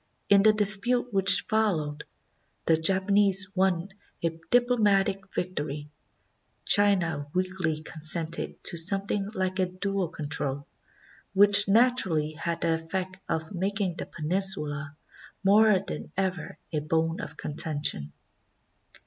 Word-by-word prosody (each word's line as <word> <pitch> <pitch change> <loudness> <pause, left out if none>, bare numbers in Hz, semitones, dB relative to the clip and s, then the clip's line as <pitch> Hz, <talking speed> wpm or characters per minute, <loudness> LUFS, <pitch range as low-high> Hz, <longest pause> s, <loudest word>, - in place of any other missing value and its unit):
In 200 -1 +6
the 215 +1 +6
dispute 215 +4 +2
which 195 -1 +4
followed, 160 -10 -1 0.6
the 165 - +4
Japanese 195 +3 +2
won 185 -1 0 0.3
a 165 - +1
diplo 245 +9 0
matic 195 -2 +1
victory; 150 -4 -5 0.7
China 175 -8 +2
weakly 185 -4 -2
consented 160 +1 -3
to 170 - +1
something 195 +3 0
like 185 0 -2
a 185 - +1
dual 185 0 -3
control, 145 -2 -3 0.7
which 205 +1 +6
naturally 195 -9 +2
had 165 +2 -5
the 165 - +1
effect 185 +2 -5
of 160 +3 -3
making 195 -1 -2
the - - -5
peninsula 155 -4 -2 0.5
more 210 +1 +5
than - - -7
ever 185 -4 -3 0.2
a 155 - 0
bone 160 +2 -1
of 150 - -9
conten 150 0 -1
tion. 75 0 +2
185 Hz, 120 wpm, -26 LUFS, 160-200 Hz, 0.7 s, In